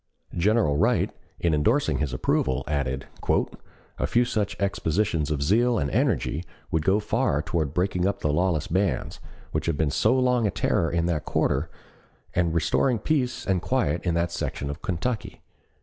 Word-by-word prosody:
General 90 -4 +2
Wright, - - +2 0.3
in 85 -2 +1
endorsing 110 - +2
his 75 -4 -1
approval, 65 0 0
added: 70 -2 -2 0.9
"A - - +1
few 120 +1 +3
such 105 -4 -1
exhibitions 85 -4 0
of 75 -2 -1
zeal 115 +8 +3
and 70 -7 -1
energy 95 - 0 0.3
would 80 -1 +1
go 95 +4 +3
far 105 - 0
toward 80 -4 -2
breaking 90 0 +1
up 100 0 -2
the 75 - +1
lawless 85 -2 +1
bands, 95 +3 -1 0.3
which - - -2
have 80 -3 0
been 75 -2 +1
so 110 - +3
long 125 -3 +2
a - - +1
terror 90 -2 +1
in 85 0 0
that 80 -3 -1
quarter, 70 +6 0 0.6
and 85 -2 +1
restoring 115 - +2
peace 130 0 -1
and 95 -3 +1
quiet 75 +4 0
in 85 -2 0
that 85 0 0
section 70 -4 -3
of 70 - -8
Kentucky." 105 +4 -3
85 Hz, 165 wpm, -25 LUFS, 75-105 Hz, 0.9 s, few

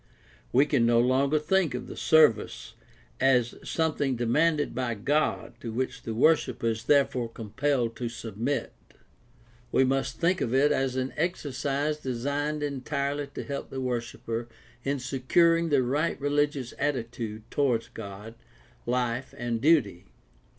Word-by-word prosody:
We 135 +4 +5
can 140 -5 +2
no 120 0 +4
longer 135 +4 +3
think 160 -1 +1
of 125 - -5
the - - -9
service 155 -8 +3 0.5
as 125 -3 +3
something 150 -5 0
demanded 145 +6 +1
by 120 -1 -2
God 145 +9 0
to 115 - -5
which 130 +3 -3
the 115 - -5
worshiper 155 -1 +2
is 110 -1 -3
therefore 135 -4 +2
compelled 115 +2 -1
to 120 0 -3
sub 115 -3 -8
mit. 120 +3 -2 1.0
We 130 - +4
must 135 +1 0
think 180 +2 +2
of 120 - 0
it 145 +2 +4
as 135 -3 0
an 130 0 -2
exercise 145 -2 -1
designed 145 +3 -2
entirely 140 +1 -2
to 140 - -7
help 140 -1 -5
the 135 - -5
worshiper 120 -2 -3 0.4
in 140 +1 0
securing 165 +6 +2
the 140 -4 +3
right 145 +7 0
religious 145 -2 0
attitude 115 -6 -3
toward 125 -6 +1
God, 105 +1 -8 0.5
life, 125 +1 -1
and 120 -1 -2
duty. 120 - +3
130 Hz, 140 wpm, -27 LUFS, 120-145 Hz, 1.0 s, We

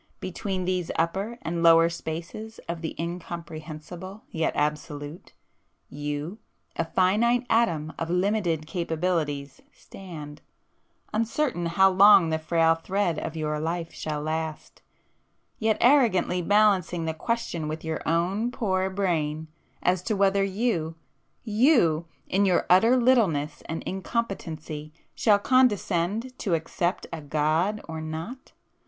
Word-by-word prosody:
Between 185 0 -3
these 180 -2 -1
upper 195 +8 -1
and 165 +1 -2
lower 165 0 +7
spaces 170 +7 -6
of 170 -1 -4
the 160 - -5
Incomprehensible 170 +3 -7
yet 160 0 0
Absolute, 150 +1 -3 0.6
you, 145 +7 -5 0.4
a 165 - -1
finite 225 +9 +2
atom 165 -9 +1
of 165 - -3
limited 180 -3 0
capabilities 160 -4 -2
stand, 155 -6 -10 0.7
uncertain 230 - 0
how 190 +3 +4
long 190 -3 +7
the 160 - 0
frail 165 0 +3
thread 175 0 -1
of 165 - -5
your 150 -1 -2
life 165 +1 -3
shall 150 -1 -4
last, 160 0 -4 0.8
yet 220 -1 +2
arrogantly 230 -9 +4
balancing 190 -3 +3
the 160 - -1
question 175 -3 -2
with 155 +1 -5
your 160 0 -3
own 185 +8 +1
poor 190 -6 -1
brain, 160 -5 -1 0.3
as 180 0 +2
to 215 +3 -1
whether 195 0 +3
you,—you 195 - 0 0.2
in 200 +2 +2
your 180 - +2
utter 225 +8 +6
littleness 195 - +2
and 160 - -4
incompetency 165 -7 -4 0.2
shall 210 -3 +4
condescend 215 -1 +1
to 185 -6 +1
accept 170 +3 -2
a 165 - -5
God 155 +8 0
or 160 -1 -5
not! 160 +12 -7
175 Hz, 120 wpm, -26 LUFS, 160-200 Hz, 0.8 s, lower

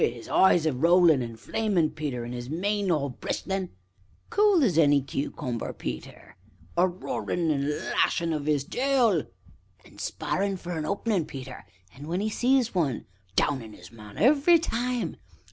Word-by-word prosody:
Wi' - - +5
'is 120 -1 -8
eyes 175 -4 +4
a 155 - +2
rollin' 165 +1 +5
an' 115 -1 -5
flamin', 180 - 0
Peter, 145 -6 -4
an' 120 - -6
'is 120 0 -6
mane 200 +5 -1
all 145 -5 0
bristlin' 190 +8 -3
SIMON. 95 - -28 0.5
Cool 410 -6 +4
as 200 - +2
any 145 -2 +5
cucumber, 135 -2 -4
Peter 60 0 -5
ANCIENT. 95 +1 -21
A 180 +2 +5
roarin' 175 -2 -2
an' 140 -2 0
a - - -1
lashin' 165 +2 0
of 150 -1 -3
'is 145 -3 +2
tail 255 - +2
SIMON. 165 -6 -1 0.6
And - - -13
sparrin' 195 0 -2
for 175 0 -7
an 155 -1 -3
openin', 200 -1 0
Peter, 130 -5 -9 0.3
and 145 +3 -10
when 175 +3 -1
'e 215 +2 -1
sees 250 0 +2
one 150 - -1 0.3
downin' 120 -7 0
'is 90 +2 -14
man 105 -3 -13
every 290 - +5
time 250 -6 -2
ANCIENT. - - -33
160 Hz, 180 wpm, -27 LUFS, 135-200 Hz, 0.6 s, Wi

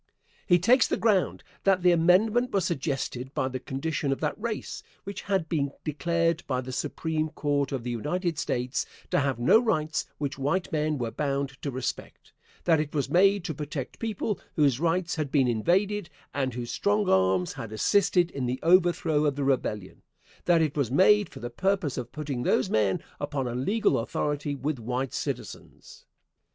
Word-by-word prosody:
He 175 - +6
takes 235 +8 +4
the - - 0
ground 210 -5 +1 0.2
that 190 -2 +3
the 180 - +6
amendment 205 +9 +3
was 195 -3 +2
suggested 135 -4 -2
by 130 - 0
the 130 0 -4
condition 140 +2 -2
of 135 - -1
that 150 - 0
race, 230 -2 -4 0.2
which 200 0 -6
had 190 -5 -1
been 140 -4 -1
declared 165 +2 0
by 130 -2 0
the 130 0 -7
Supreme 155 +4 -2
Court 145 -3 -1
of 135 -4 -3
the 120 - -3
United 165 - -2
States 125 +1 -1 0.2
to - - +3
have 140 -3 0
no 120 - +5
rights 155 - 0
which 140 -2 -4
white 150 +7 -1
men 155 -1 0
were 120 -3 -3
bound 140 0 -1
to 145 - -3
respect; 130 -2 -5 0.3
that 165 -3 +4
it 150 0 -3
was 140 -1 -1
made 195 +2 +4
to 165 - -3
protect 145 -2 -6
people 215 -2 -2 0.2
whose 140 -5 +3
rights 170 +1 0
had 150 -3 -1
been 135 -3 +3
invaded, 180 - +1 0.2
and 130 -4 -1
whose 120 -1 -4
strong 205 0 +1
arms 95 - +2
had 115 -6 -7
assisted 175 - +2
in 130 -3 -3
the 125 +2 -2
overthrow 170 -3 +3
of 145 -2 +1
the 145 - -2
Rebellion; 110 -8 -1 0.4
that 170 -2 +4
it 150 -3 -1
was 140 -6 0
made 200 +8 +4
for - - -11
the 120 +1 -5
purpose 190 0 0
of 125 -2 -5
putting 140 -3 -4
these 130 - +1
men 105 -3 +1 0.2
upon 145 -3 -2
a 120 - -3
legal 170 - +1
authority 145 +4 -2
with 140 0 -3
white 125 +3 -3
citizens. - - -6
150 Hz, 180 wpm, -27 LUFS, 130-175 Hz, 0.4 s, He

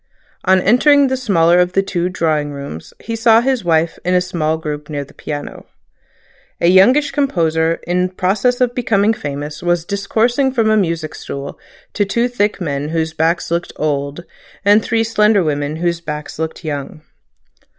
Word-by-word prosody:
On 190 0 +4
entering 270 +8 +4
the 260 - 0
smaller 175 -9 +3
of 180 0 +1
the 195 - +2
two 180 -2 -2
drawing 155 -5 -1
rooms 140 - -8
he 230 - -4
saw 225 0 +5
his 255 -2 0
wife 165 -1 +1
in 180 +1 +1
a - - +5
small 170 -4 -1
group 150 -1 -6
near 145 -2 -3
the - - -19
piano. 145 -1 -7 0.9
A 170 - +3
youngish 250 +11 +5
composer 165 - +1
in 180 +1 0
pass 185 +2 -1
of 245 0 +2
becoming 220 -3 +1
famous 145 -3 -6
was 175 -1 0
discoursing 225 +7 0
from 225 -4 +2
a - - +4
music 165 -6 -1
stool 140 0 -7 0.3
to 205 - +1
two 235 +5 0
thick 210 -5 -1
men 145 -4 -3
whose 160 0 -2
backs 165 +2 0
looked 170 +1 -2
old, 145 +2 -2 0.4
and 205 +2 +5
three 225 0 +1
slender 210 -3 +3
women 145 -1 -2
whose 170 0 -1
backs 150 -2 -6
looked 160 +2 -4
young. 145 0 -5
175 Hz, 170 wpm, -17 LUFS, 155-215 Hz, 0.9 s, saw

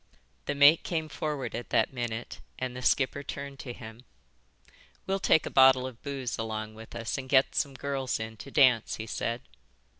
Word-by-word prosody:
The - - -2
mate 145 +3 +7
came 160 -3 -3
forward 145 -5 -3
at 120 +1 -5
that - - +2
minute 120 -2 -4 0.2
and 130 -1 -4
the 125 - -6
skipper 135 +2 +2
turned 140 0 -7
to 120 +1 -6
him. 115 0 -10 1.0
"We'll 195 +1 0
take 160 - +3
a - - -5
bottle 130 -1 +6
of 130 -3 -8
booze 135 -5 -4
along 110 -1 -4
with 110 +1 -12
us 115 +3 -3
and 130 -1 -8
get 130 -1 +4
some 140 -2 -1
girls 135 -2 -2
in 110 0 -5
to 100 - -9
dance," 130 -6 +4
he 110 - -6
said. 115 +2 -3
130 Hz, 185 wpm, -29 LUFS, 115-140 Hz, 1.0 s, mate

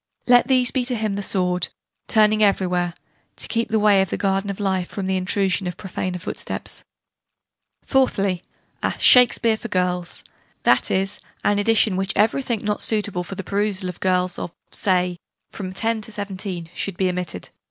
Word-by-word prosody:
Let 245 -1 +5
these 255 -3 +4
be 260 - 0
to 250 0 -1
him 215 -2 -1
the 200 - -3
sword, 180 -3 0 0.4
turning 215 0 +4
everywhere 180 -4 +1 0.4
to - - -3
keep 230 +1 -1
the 220 - +2
way 205 -2 +5
of 190 - -1
the - - -2
Garden 195 0 0
of 200 - -5
Life 190 -3 -1
from 200 - -4
the 190 0 0
intrusion 190 0 0
of 180 0 -5
profaner 185 -1 -4
footsteps." 175 - -4 1.0
Fourthly, 200 -9 +1 0.4
a - - -1
"Shakespeare" 235 -3 +5
for 235 - -7
girls: 180 -3 -2 0.4
that - - +3
is, 195 +2 -1 0.2
an 205 0 +2
edition 220 -1 +3
in - - -2
which 195 +1 0
everything, 225 +2 +1
not 210 0 -1
suitable 205 -5 +1
for 195 - -8
the 195 - -5
perusal 200 0 -1
of 180 - -8
girls 180 0 0
of - - -5 0.2
(say) 180 -2 +1 0.3
from 185 -3 -6
10 225 +3 0
to 220 - -4
17, 190 -4 -5
should 195 -1 -3
be 190 - +1
omitted. 180 - -3
195 Hz, 175 wpm, -22 LUFS, 180-215 Hz, 1.0 s, Let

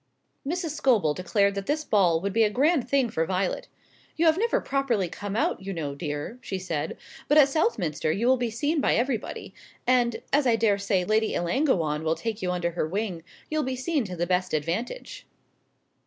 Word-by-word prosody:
Mrs. 330 +2 -2
Scobel 235 - +2
declared 200 +4 +1
that 200 0 -5
this 305 +1 0
ball 180 - +3
would 200 +1 -2
be 230 - +3
a 215 - +3
grand 270 +2 +2
thing 275 -2 +3
for 160 - 0
Violet. 185 +2 -1 0.5
"You 330 - +1
have 320 -1 +5
never 460 +6 +1
properly 255 -9 0
come 205 +4 -6
out, 220 - 0
you 195 +1 -5
know, 150 -5 -3
dear," 150 - -5
she 190 - -4
said; 170 -5 -3 0.3
"but 295 - +4
at 285 -2 +7
Southminster 180 - 0
you 205 +8 -1
will 260 +1 +5
be 245 -2 -1
seen 290 +7 0
by - - +2
everybody; 240 -2 -2 0.3
and, 245 -2 +2
as 285 -1 +4
I 235 - +4
daresay 200 -4 +1
Lady 215 +3 +1
Ellangowan 170 - +1
will 160 0 +1
take 225 +1 -4
you 180 - -1
under 175 -1 -1
her 165 -2 -2
wing, 190 -1 -3 0.3
you'll 310 0 +1
be 260 -2 -2
seen 275 +2 0
to 185 -2 -6
the 175 0 -1
best 180 -1 0
advantage." 180 - -4
210 Hz, 195 wpm, -26 LUFS, 180-265 Hz, 0.5 s, at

